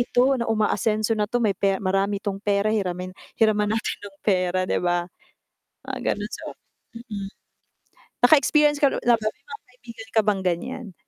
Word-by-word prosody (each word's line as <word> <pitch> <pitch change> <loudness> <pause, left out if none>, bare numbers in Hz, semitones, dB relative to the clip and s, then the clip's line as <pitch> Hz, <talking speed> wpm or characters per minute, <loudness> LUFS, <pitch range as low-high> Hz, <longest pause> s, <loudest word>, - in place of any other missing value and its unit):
ito 245 +2 +3
na 235 - -2
umaasenso 215 0 +1
na 210 -2 0
'to, 245 -1 0
may 205 - +3
pe 195 +1 +1
marami 195 +1 -1
'tong 200 -1 -3
pera, 205 +1 +1
hiramin 185 -3 -2 0.2
hiraman 215 -1 +2
natin 225 - -2
ng 195 - -22
pera," 185 -2 +1
'di - - -1
ba? 175 -1 0 0.8
Mga - - -5 0.2
ganon - - -6
so, - - -7 0.5
mm. 205 -5 -6 1.0
Nakaexperience 295 +1 +5
ka 285 - +5
na - - -3
na 240 -1 +5
ba, 215 - -4
may - - -11
mga 445 -3 -10
kaibigan 230 -3 -12
ka - - +7
bang 205 -2 +1
ganiyan? 190 +3 -3
210 Hz, 175 wpm, -24 LUFS, 195-235 Hz, 1.0 s, ka